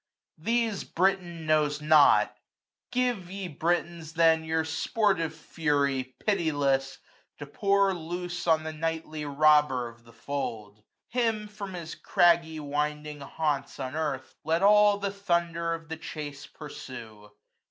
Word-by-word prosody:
These 225 +3 0
Britain 175 -3 0
knows 150 -1 +2
not; 150 -1 +5 0.6
give, 245 -8 0
ye 195 0 -5
Britons, 170 0 -2
then 160 -1 +4
Your 160 0 0
sportive 165 0 0
fury, 140 -5 -1
pitiless, 145 -8 +1 0.4
to 145 - -7
pour 195 +6 +2
471 165 -3 -6
Loose 175 -1 -5
on 160 -1 +4
the 160 0 -5
nightly 155 -1 -3
robber 145 -3 +4
of 115 0 -18
the 115 - -17
fold: 110 -5 -5 0.3
Him, 225 -3 0
from 200 -2 -7
his 165 -2 -6
craggy 165 -2 +2
winding 150 0 -3
haunts 145 0 -2
unearthM, 135 0 -3
Let 165 +4 +1
all 210 0 +6
die 200 -1 -2
thunder 170 -4 0
of 165 0 -11
the 160 +1 -5
chase 145 -3 -7
pursue. 115 -8 -10
160 Hz, 130 wpm, -28 LUFS, 145-175 Hz, 0.6 s, all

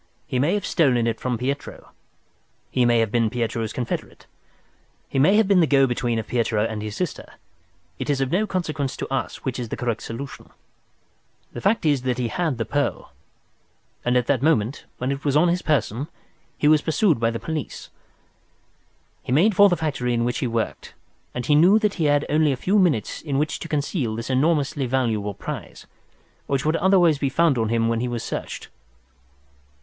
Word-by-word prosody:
He 125 - -2
may 155 +9 +2
have 205 - -2
stolen 130 -9 +2
it 115 -1 -1
from 125 -2 -2
Pietro, 135 +4 -5 0.8
he 125 -2 +2
may 120 0 +4
have 110 -2 -1
been 115 -2 +2
Pietro's 115 -2 -2
confederate, 120 -2 -5 0.8
he 135 - -1
may 160 +9 +5
have 220 -2 +4
been 195 -2 +4
the 165 - +4
go 135 -2 +4
between 120 -2 -1
of 110 - -3
Pietro 110 -3 0
and 110 -2 -4
his 105 -1 -5
sister. 180 +2 -4 0.7
It 130 - -4
is 140 -2 +1
of 135 0 -1
no 210 +5 +1
consequence 155 -8 -2
to - - -4
us 135 - -3
which 130 -2 -2
is 120 -2 -4
the - - -4
correct 115 -2 -2
solution. 125 +5 -7 1.1
"The - - -9
main - - -5
fact 200 -2 +1
is 145 -4 +2
that 125 -1 -1
he 125 -2 -1
had 165 -5 -1
the 115 - -2
pearl, 140 +6 -2 0.9
and 125 +1 +2
at 125 - +1
that 130 -2 +1
moment, 130 -5 +1
when 125 +2 -2
it 140 +1 -4
was 145 0 +2
on 175 +3 +4
his 180 +1 0
person, 140 -2 0 0.5
he 150 - +1
was 155 -1 +5
pursued 160 - +2
by 115 0 +2
the 115 0 -4
police. 160 -3 -5 1.3
He - - -7
made 185 +10 +4
for 205 +1 +7
the 175 - +1
factory 130 -6 -1
in 115 0 0
which 120 0 -1
he 130 - -1
worked, 115 -1 -3 0.4
and 125 -1 -3
he 150 - +3
knew 175 +8 +6
that 210 -2 +1
he - - +2
had 145 0 +2
only 150 0 +2
a 135 - -2
few 200 +8 +2
minutes 155 - +1
in 140 -4 -2
which 150 +1 -1
to - - -6
conceal 145 - -1
this 115 +3 -4
enormously 145 -1 +1
valuable 110 -6 -1
prize, - - -7 0.6
which 140 -1 -1
would 155 +1 +2
otherwise 175 -5 +4
be 140 - 0
found 155 -2 +2
on 110 -1 0
him 115 0 +1
when 115 0 0
he 125 - -1
was 120 -2 -3
searched. - - -5
135 Hz, 200 wpm, -23 LUFS, 120-155 Hz, 1.3 s, for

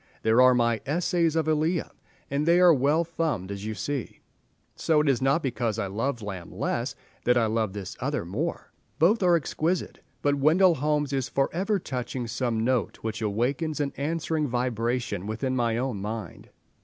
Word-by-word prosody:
There 110 +3 +5
are 130 0 +7
my 115 -3 +1
"Essays 165 +2 +1
of 160 -1 +1
Elia," 155 +2 +1 0.4
and 145 +3 0
they 170 +1 +5
are 180 -2 +7
well 145 +4 +2
thumbed 155 - -2
as 100 +1 -6
you 110 - -3
see, 140 0 -4 0.6
so 160 -2 +2
it 150 - +1
is 135 -3 +2
not 135 +5 +2
because 120 -4 -1
I 110 - -1
love 115 +5 -2
Lamb 95 -4 -6
less - - -2 0.3
that 125 0 +3
I 115 - +3
love 110 -2 0
this 100 -3 -6
other - - -2
more. 135 - -4 0.3
Both 190 +9 +4
are 175 -2 +5
exquisite, 165 +2 -1 0.2
but 145 - +3
Wendell 160 +6 +4
Holmes 150 -1 0
is 135 -2 -1
for 135 0 0
ever 195 +4 +1
touching 125 -6 -4
some 115 -1 -1
note 125 0 0
which 110 0 -3
awakens 130 +9 -1
an 140 -1 -1
answering 155 +1 -1
vibration 120 -4 -1
within 130 +4 -2
my 115 -2 +1
own 125 -5 -2
mind. 110 +1 -6
130 Hz, 180 wpm, -26 LUFS, 115-155 Hz, 0.6 s, are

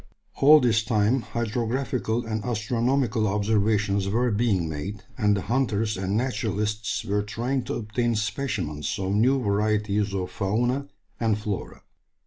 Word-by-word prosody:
All 150 +3 +8
this 115 -4 +3
time 110 +3 +2
hydrographical 120 +1 -2
and 110 -1 -3
astronomical 120 0 0
observations 105 -1 +1
were 120 +4 +1
being 100 -6 +1
made, 95 +7 -5
and 105 -1 +2
the 95 - -3
hunters 115 -4 0
and 95 +2 -1
naturalists 105 -4 -1
were 105 +1 0
trying 120 +6 -2
to - - -3
obtain 115 +2 -1
specimens 105 - -2
of 95 0 -1
new 125 +6 +3
varieties 105 -1 0
of 90 -1 -3
fauna 120 +8 0 0.3
and 110 -3 +1
flora. 105 -2 -5
110 Hz, 130 wpm, -25 LUFS, 100-120 Hz, 0.3 s, All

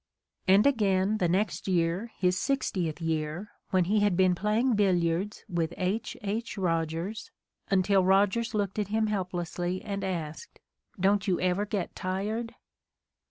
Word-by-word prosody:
And 195 +3 +6
again, 210 -5 +2
the 175 - +2
next 200 +4 0
year, 180 +5 0
his 180 -1 +2
sixtieth 185 - -1
year, 165 +4 -2 0.2
when 185 -1 +3
he 210 +4 +2
had 205 -4 +2
been 185 -1 +4
playing 215 +7 +1
billiards 185 -1 +1
with 170 -1 -2
H. 200 +4 -2
H. 215 +3 -3
Eogers, 165 +3 -2 0.4
until 195 0 +3
Rogers 200 +5 +2
looked 205 0 -1
at 205 - 0
him 220 +2 +1
helplessly 180 -3 -2
and 200 -2 -4
asked, 165 -5 -5 0.4
"Don't 200 +2 +2
you 180 -3 +2
ever 185 +3 +1
get 200 -3 -3
tired?" 210 +5 -3
190 Hz, 140 wpm, -28 LUFS, 175-210 Hz, 0.4 s, And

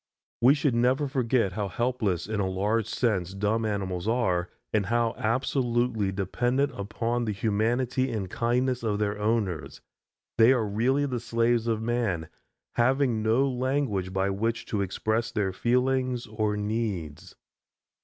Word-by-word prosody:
We 130 +4 +6
should 140 -3 +1
never 130 +5 +2
forget 125 -6 +1
how 105 0 -2
helpless, 105 -4 -1
in 110 0 -3
a 95 -2 0
large 105 +4 0
sense, 95 -6 -1
dumb 105 +3 0
animals 95 -3 -3
are 95 -7 +1 0.2
and 105 -3 +1
how 115 -1 +1
absolutely 120 -3 0
dependent 120 +9 0
upon 115 +4 -2
the 110 - -1
humanity 120 +5 0
and 105 -4 -3
kindness 125 +5 0
of 110 -3 0
their 105 0 -1
owners. 100 -9 -1 0.6
They 115 +3 +7
are 120 -4 +1
really 125 +8 +1
the 125 -3 -2
slaves 115 0 +1
of 110 -1 0
man, 110 -9 -1 0.5
having 125 -1 +2
no 115 +5 +3
language 130 -7 -1
by 95 +1 0
which 115 +4 -1
to 100 - +1
express 110 +4 -1
their 100 -4 -1
feelings 125 +2 +1
or 105 -1 -1
needs. 105 - -3
115 Hz, 145 wpm, -27 LUFS, 100-125 Hz, 0.6 s, They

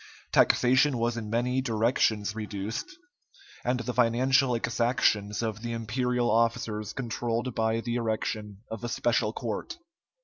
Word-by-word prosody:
Taxation 130 +2 +4
was 120 0 0
in 110 -2 -5
many 125 +3 +1
directions 110 -3 +1
reduced, 105 - -5 0.7
and 125 0 0
the 125 +1 -3
financial 125 +2 +3
exactions 115 -3 +1
of 110 -1 -3
the 120 0 -4
imperial 120 +2 0
officers 115 -2 0
controlled 120 0 -2
by 110 0 0
the 120 +1 -2
erection 110 -2 -3
of 110 +1 -6
a 120 - -2
special 115 -2 +1
court. 115 - -4
115 Hz, 130 wpm, -28 LUFS, 110-125 Hz, 0.7 s, Taxation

